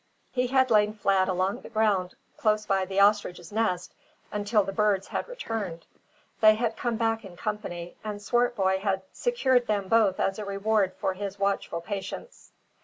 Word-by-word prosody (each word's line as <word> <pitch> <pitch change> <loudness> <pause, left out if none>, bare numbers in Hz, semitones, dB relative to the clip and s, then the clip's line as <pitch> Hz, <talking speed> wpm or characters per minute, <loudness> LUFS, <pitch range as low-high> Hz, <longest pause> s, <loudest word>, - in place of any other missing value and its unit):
He 250 -1 0
had 260 -1 +3
lain 210 -1 +4
flat 195 -2 +2
along 185 +2 0
the - - -11
ground 210 -5 +1 0.2
close 215 -1 +1
by 195 -2 +1
the 195 +1 -1
ostrich's 200 -4 +2
nest 205 -5 -1 0.4
until 210 +1 +1
the 195 - -4
birds 205 -2 +1
had - - -3
returned. 225 - -5 0.5
They 215 -1 +7
had 225 0 -1
come 240 0 -1
back 225 -1 0
in 185 -4 -11
company, 175 -5 -5
and 210 -1 -4
Swartboy 205 -4 +1
had 190 -1 -1
secured 260 - +1
them 205 -2 0
both 215 -5 +3
as 195 +2 0
a - - -3
reward 200 -1 +1
for 190 - -1
his 200 +1 -5
watchful 195 -4 -1
patience. 200 - -7
205 Hz, 170 wpm, -27 LUFS, 190-225 Hz, 0.5 s, They